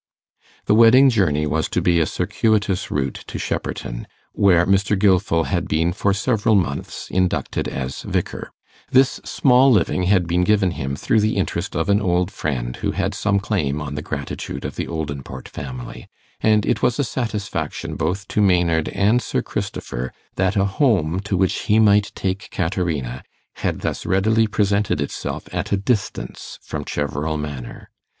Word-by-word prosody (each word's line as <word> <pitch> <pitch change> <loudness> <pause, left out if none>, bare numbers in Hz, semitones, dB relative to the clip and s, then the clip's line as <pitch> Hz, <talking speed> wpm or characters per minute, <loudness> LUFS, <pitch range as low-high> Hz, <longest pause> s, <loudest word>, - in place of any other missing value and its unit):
The - - +3
wedding 120 +5 +7
journey 80 -9 +2
was 80 +2 -1
to - - 0
be 85 -1 +3
a 80 - +2
circuitous 105 -4 0
route 70 -2 -2
to - - -6
Shepperton, - - -4 0.3
where 90 -4 +4
Mr. 100 +2 +2
Gilfil 95 -4 +3
had 90 -3 -1
been 80 +2 +1
for 100 +2 +1
several 110 +2 +1
months 85 -7 -2
inducted 90 -1 0
as 65 0 -4
vicar. - - -3 0.4
This 130 0 +3
small 130 0 +4
living 95 -3 +2
had 95 -3 +4
been 85 +2 +1
given 100 -1 +3
him 70 -4 -3
through 110 +9 +1
the 105 +1 +1
interest - - -2
of 80 +4 0
an 100 +1 +3
old 90 0 +1
friend 60 -10 -3
who - - -2
had - - -1
some 100 -1 +1
claim 80 -9 -1
on 70 -2 -5
the 75 - -4
gratitude 70 -2 -5
of - - -5
the - - -3
Oldinport 70 -4 -5
family; 65 -3 -8 0.3
and 105 -1 +3
it - - 0
was 125 -2 +2
a 145 - +1
satisfaction 105 - -3
both 95 +5 -2
to 105 - +1
Maynard 85 -5 +2
and 105 +5 +2
Sir - - -2
Christopher 65 +1 -4 0.2
that 95 +2 +1
a 100 -1 +3
home 95 - +1
to 100 -1 -2
which 95 0 0
he 105 - +4
might 105 -2 +4
take 95 +3 -3
Caterina 80 - -2 0.4
had - - -2
thus - - -3
readily 110 +4 +3
presented 100 -4 +1
itself 70 - -4
at - - -3
a 100 - +3
distance 100 +1 -3
from - - -5
Cheverel 75 +2 -2
Manor. 70 -5 -7
95 Hz, 165 wpm, -21 LUFS, 80-105 Hz, 0.4 s, wedding